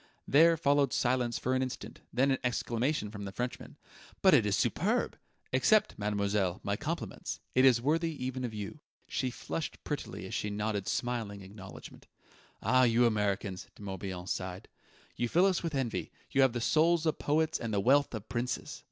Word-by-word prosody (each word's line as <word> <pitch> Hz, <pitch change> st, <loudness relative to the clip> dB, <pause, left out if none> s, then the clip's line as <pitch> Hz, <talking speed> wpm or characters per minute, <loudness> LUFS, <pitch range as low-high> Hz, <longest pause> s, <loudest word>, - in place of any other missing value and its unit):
There 165 Hz, +4 st, +6 dB
followed 145 Hz, -2 st, +3 dB
silence 120 Hz, -1 st, +1 dB
for 130 Hz, -, -1 dB
an 130 Hz, -, +2 dB
instant, 130 Hz, -1 st, -5 dB
then 135 Hz, +3 st, +3 dB
an 135 Hz, -, +1 dB
exclamation 120 Hz, -1 st, -1 dB
from 100 Hz, -1 st, -6 dB
the 100 Hz, -, -5 dB
Frenchman: 125 Hz, +5 st, -5 dB, 0.5 s
"But -, -, +7 dB
it -, -, +5 dB
is -, -, +2 dB
superb! -, -, +1 dB, 0.4 s
Accept, 205 Hz, -, +3 dB
mademoiselle, 100 Hz, -3 st, 0 dB
my -, -, 0 dB
compliments. -, -, -4 dB
It 130 Hz, +1 st, +5 dB
is 125 Hz, -3 st, +6 dB
worthy 165 Hz, +4 st, +1 dB
even 130 Hz, 0 st, -3 dB
of 120 Hz, -, -2 dB
you." 105 Hz, +7 st, -6 dB, 0.3 s
She 130 Hz, -, -1 dB
flushed 150 Hz, +5 st, -5 dB
prettily 145 Hz, -9 st, -4 dB
as 95 Hz, -, -7 dB
she 105 Hz, -, -1 dB
nodded 105 Hz, -1 st, -2 dB
smiling 115 Hz, -5 st, -2 dB
acknowledgement. 95 Hz, 0 st, -11 dB, 0.6 s
"Ah, 130 Hz, +5 st, +4 dB
you 120 Hz, -1 st, +4 dB
Americans!" 100 Hz, -4 st, 0 dB
De -, -, -12 dB
Morbihan 95 Hz, -2 st, -5 dB
sighed. 90 Hz, 0 st, -4 dB, 0.5 s
"You 120 Hz, 0 st, 0 dB
fill 175 Hz, +8 st, +4 dB
us 190 Hz, -3 st, +2 dB
with 165 Hz, -3 st, -3 dB
envy: 130 Hz, -5 st, -2 dB, 0.2 s
you 135 Hz, -, +3 dB
have 130 Hz, -3 st, +4 dB
the 120 Hz, -, -2 dB
souls 165 Hz, +5 st, +3 dB
of 155 Hz, -, 0 dB
poets 155 Hz, +2 st, +1 dB
and 115 Hz, -, -3 dB
the 100 Hz, -, +1 dB
wealth 135 Hz, +4 st, +3 dB
of 110 Hz, -1 st, -7 dB
princes!" 125 Hz, +1 st, -3 dB
120 Hz, 180 wpm, -31 LUFS, 105-140 Hz, 0.6 s, But